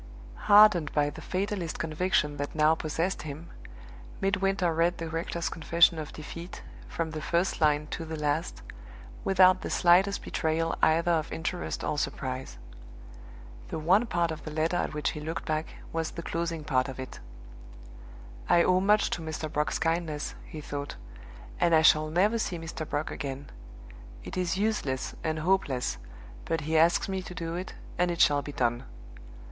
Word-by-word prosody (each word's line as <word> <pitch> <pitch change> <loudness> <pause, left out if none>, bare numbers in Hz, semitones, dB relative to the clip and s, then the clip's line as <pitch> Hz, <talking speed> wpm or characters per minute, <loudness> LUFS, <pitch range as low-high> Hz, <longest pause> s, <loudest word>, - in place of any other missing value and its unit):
Hardened 205 -8 +7
by 145 -1 +2
the - - -10
fatalist 190 -3 -3
conviction 155 -2 0
that 145 +2 -4
now 155 0 +5
possessed 165 +4 -2
him, 155 +3 -8 0.7
Midwinter 195 -3 +1
read 170 +2 +1
the 165 - -4
rector's 165 +1 -3
confession 165 0 +3
of 155 - -6
defeat, 170 +4 -9 0.2
from 165 -1 -3
the 155 -1 -5
first 170 +3 0
line 150 -1 +3
to 165 - -4
the 160 0 -5
last, 150 +3 -2 0.6
without 185 -1 +5
the - - -4
slightest 185 +3 +4
betrayal 165 0 -1
either 165 +2 +3
of 160 -2 0
interest 175 +2 -3
or 150 - -1
surprise. 130 - -4 1.1
The - - -4
one 185 +9 +3
part 170 -4 0
of 160 - -7
the - - -6
letter 160 +3 0
at 155 - -2
which 150 - 0
he 150 - -6
looked 160 +2 -5
back 155 0 -1 0.3
was 165 -1 -1
the 170 - -7
closing 165 -1 -3
part 130 -2 +1
of 130 - -8
it. 130 - -7 1.3
"I 170 - +6
owe 185 0 +4
much 210 +3 +3
to 175 - -2
Mr. 155 -1 -5
Brock's 150 0 0
kindness," 165 -2 -1
he 155 - -8
thought; 145 -1 -5 0.6
"and 170 -2 +4
I 160 - +5
shall 155 0 +5
never 200 +8 +2
see 185 -5 -2
Mr. 160 -1 -6
Brock 145 +1 -2
again. 140 0 -6 0.7
It - - -7
is 180 0 -1
useless 200 -11 -1
and 160 0 -1
hopeless; 155 - 0 0.5
but 165 -1 -1
he 155 +2 -2
asks 165 +2 +4
me 190 -1 -2
to 180 -1 -9
do 165 -2 -4
it, 180 +2 -5 0.2
and 180 0 +3
it 170 -1 -3
shall 145 -1 +5
be 145 - -7
done. 120 -3 -1
165 Hz, 170 wpm, -28 LUFS, 150-175 Hz, 1.3 s, Hardened